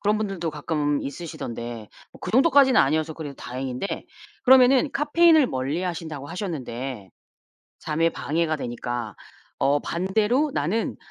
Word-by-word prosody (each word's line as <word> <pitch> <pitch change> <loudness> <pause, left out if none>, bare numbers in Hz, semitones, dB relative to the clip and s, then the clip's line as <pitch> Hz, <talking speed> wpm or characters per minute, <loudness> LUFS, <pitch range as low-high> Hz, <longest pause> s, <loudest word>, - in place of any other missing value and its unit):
그런 210 +1 +1
분들도 195 -6 -2
가끔 150 -1 -1
있으시던데 120 -7 -6 0.2
뭐 - - -16
그 - - -5
정도까지는 270 +1 +5
아니어서 155 +3 +1
그래도 150 -3 -7
다행인데. 130 +6 -5 0.4
그러면은 260 +2 +6
카페인을 310 +1 +4
멀리 135 +7 -2
하신다고 160 -5 -5
하셨는데 130 - -5 0.7
잠에 165 +2 +1
방해가 160 0 -1
되니까 120 -4 -4 0.4
어 140 +1 +3
반대로 210 - 0
나는 180 +11 -1
160 Hz, 335 characters per minute, -24 LUFS, 135-215 Hz, 0.7 s, 그러면은